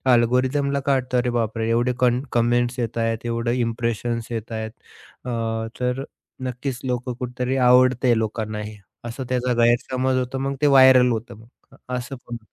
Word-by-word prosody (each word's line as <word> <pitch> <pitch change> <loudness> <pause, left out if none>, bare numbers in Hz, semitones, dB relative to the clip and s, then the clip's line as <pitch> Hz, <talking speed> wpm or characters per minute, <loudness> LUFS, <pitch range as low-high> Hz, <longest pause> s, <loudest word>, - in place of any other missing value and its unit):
अल्गोरिदमला 130 +4 +1
काय 140 0 +1
वाटत 130 -1 -2
अरे 125 0 +2
बापरे 115 -1 -1
एवढे 120 +2 +2
कन 125 0 +3
कमेंट्स 120 +1 +1
येत 115 -1 -3
आहेत, 115 0 -1
एवढे 115 0 -1
इम्प्रेशन्स 115 0 -2
येत 115 0 -5
आहेत 110 -1 -4 0.5
अ, - - -4 0.5
तर 125 +1 -1 0.4
नक्कीच 125 +1 -4
लोक 125 0 -2
कुठेतरी 125 +1 -3
आवडतं 125 0 +4
आहे 120 -2 +4
लोकांना 110 -1 -3
हे. 105 0 -8 0.3
असं 120 +3 -5
त्याचा 125 0 0
गैरसमज 130 +2 +1
होतो 130 +1 -3
मग 135 +1 -2
ते 145 - +4
व्हायरल 130 -2 +7
होतं 115 0 -4
मग 115 - -16 0.2
अ, - - -17 0.2
असं 125 +2 -5
पण. 120 -1 -5
125 Hz, 170 wpm, -22 LUFS, 115-130 Hz, 0.5 s, व्हायरल